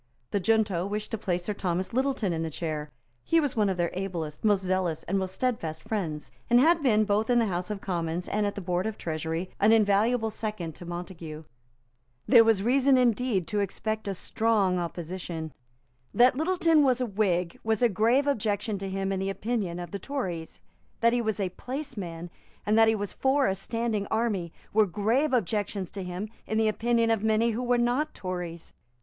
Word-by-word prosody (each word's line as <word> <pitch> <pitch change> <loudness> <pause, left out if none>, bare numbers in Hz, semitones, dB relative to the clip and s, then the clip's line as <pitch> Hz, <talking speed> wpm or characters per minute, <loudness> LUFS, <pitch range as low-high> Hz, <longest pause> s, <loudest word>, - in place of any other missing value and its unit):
The 205 - +1
junto 195 -3 +1
wished 210 +1 -4
to 225 - -1
place 180 -4 -1
Sir 210 - -2
Thomas 185 -1 -2
Littleton 260 -7 0
in 165 - -2
the 165 - -2
chair. 155 -1 -4 0.3
He 330 - +3
was 290 -4 -1
one 210 -3 +2
of 190 - -1
their 170 -1 0
ablest, 175 -5 -4
most 205 -3 +3
zealous 185 -3 -1
and 195 +2 0
most 190 0 -4
steadfast 165 -12 -2
friends; 165 -9 -3 0.2
and 240 0 +6
had 330 +4 +4
been, 215 -6 +3
both 210 +2 +1
in 245 - +4
the 235 - +4
House 180 -2 -2
of 205 -2 -4
Commons 170 -1 -2
and 210 +1 0
at 200 - -3
the 200 - -5
Board 180 +2 -1
of 220 - -4
Treasury, 165 +2 -3
an 210 +2 +5
invaluable 220 +2 +3
second 210 -8 -4
to 175 - -11
Montague. 170 -3 -7 0.8
There 235 -3 +7
was 220 -3 +3
reason 265 +3 +4
indeed 240 -5 +2
to 210 - 0
expect 215 +2 -2
a 195 - -2
strong 200 -3 +1
opposition. 170 -2 -5 0.6
That 250 +2 +6
Littleton 325 0 +3
was 260 -3 +3
a 250 - +1
Whig 185 -5 0
was 220 +1 +1
a - - +7
grave 230 +7 +2
objection 210 -6 -1
to 195 0 -4
him 195 0 -2
in 190 - -1
the 195 +1 -1
opinion 195 -3 -2
of 175 - -7
the 200 - -4
Tories. 185 - -5 0.4
That 235 0 +4
he 245 - +2
was 220 -2 -1
a 190 -3 -1
placeman, 200 - -6 0.3
and 210 - +2
that 225 0 +6
he 220 - +4
was 205 -1 -4
for 270 +1 +2
a 190 - +2
standing 215 +1 -2
army, 215 -7 -1 0.2
were 215 0 +4
grave 225 - +1
objections 205 -4 -1
to 200 - -6
him 180 +3 -4 0.2
in 220 - -1
the 220 0 +3
opinion 230 +1 +1
of 225 -3 +1
many 220 +1 +3
who 225 +3 -2
were 245 0 +2
not 245 +6 0
Tories. 175 -3 -6
205 Hz, 200 wpm, -27 LUFS, 180-230 Hz, 0.8 s, There